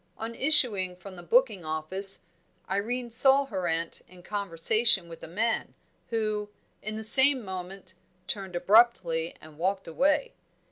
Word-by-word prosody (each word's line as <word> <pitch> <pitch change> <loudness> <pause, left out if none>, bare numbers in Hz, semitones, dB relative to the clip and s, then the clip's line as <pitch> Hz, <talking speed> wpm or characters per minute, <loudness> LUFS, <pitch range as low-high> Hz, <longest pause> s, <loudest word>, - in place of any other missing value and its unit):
On 225 +1 -6
issuing 230 -10 +1
from 185 +1 -12
the 175 - -10
booking 220 0 +1
office, 160 +5 -1 0.5
Irene 235 +5 -3
saw 270 +4 +4
her 190 -8 -4
aunt 165 0 -2
in 180 -1 -17
conversation 200 +1 +1
with 165 -1 -12
a - - -9
man, 220 +7 -2 0.3
who, 215 -2 -2 0.3
in 215 0 -5
the 220 - -5
same 265 +2 +7
moment, 190 0 -8 0.3
turned 190 -2 -5
abruptly 180 -4 +2
and 155 -1 -16
walked 190 +2 -2
away. 280 - 0
200 Hz, 140 wpm, -27 LUFS, 180-230 Hz, 0.5 s, same